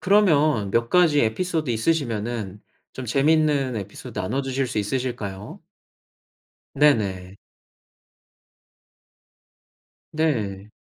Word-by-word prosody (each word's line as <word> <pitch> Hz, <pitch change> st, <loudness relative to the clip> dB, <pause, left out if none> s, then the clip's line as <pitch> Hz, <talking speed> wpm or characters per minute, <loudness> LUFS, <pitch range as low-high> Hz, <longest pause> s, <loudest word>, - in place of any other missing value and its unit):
그러면 155 Hz, -, +3 dB
몇 115 Hz, +1 st, 0 dB
가지 165 Hz, -5 st, +4 dB
에피소드 155 Hz, +5 st, -1 dB
있으시면은 115 Hz, -, -2 dB, 0.3 s
좀 130 Hz, -1 st, -7 dB
재밌는 145 Hz, 0 st, +2 dB
에피소드 100 Hz, -1 st, -7 dB
나눠주실 135 Hz, +6 st, -1 dB
수 110 Hz, -3 st, -3 dB
있으실까요? 105 Hz, -3 st, -4 dB, 1.1 s
네네. 100 Hz, -10 st, +1 dB, 2.8 s
네. 110 Hz, -11 st, -1 dB
125 Hz, 200 characters per minute, -23 LUFS, 105-150 Hz, 2.8 s, 가지